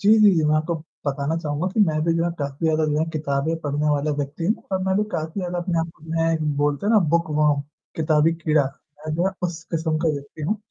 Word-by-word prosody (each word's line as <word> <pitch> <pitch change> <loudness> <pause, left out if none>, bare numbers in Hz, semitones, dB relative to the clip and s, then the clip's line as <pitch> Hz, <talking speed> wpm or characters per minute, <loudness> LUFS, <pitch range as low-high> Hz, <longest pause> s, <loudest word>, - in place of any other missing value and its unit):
जी, 200 - +1
जी, 210 -1 +8
जी, 160 -2 +2
मैं 150 0 +3
आपको 155 +2 0 0.3
बताना 140 +3 -1
चहूँगा 155 +1 -2
कि 220 - +1
मैं 155 -1 0
भी 165 - +3
जो 165 - +1
है 175 - +1
काफ़ी 140 +3 -2
ज़्यादा 155 0 +2
जो 150 - +1
है 155 - +2
किताबें 150 0 -1
पढ़ने 145 0 0
वाला 145 +1 +1
व्यक्ति 145 +4 -3
हूँ 210 +6 +3 0.2
और 190 - +2
मैं 190 0 +1
भी 210 - +3
काफ़ी 160 +5 -3
ज़्यादा 180 -1 -3
अपने 175 -1 -1
आप 165 0 -3 0.5
में 150 -2 -1
बोलते 145 +5 0
हैं 220 - +3
ना 220 - +7
बुकवॉर्म, 150 -3 +2 0.4
किताबी 155 0 +3
कीड़ा। 155 -3 +2 0.4
मैं 155 - -2
जो 175 +3 +1
है - - +1
उस 170 -2 -2
किस्म 160 -1 0
का 165 +1 +1
व्यक्ति 140 +2 -8
हूँ। 195 +9 0
155 Hz, 240 wpm, -23 LUFS, 150-170 Hz, 0.5 s, जी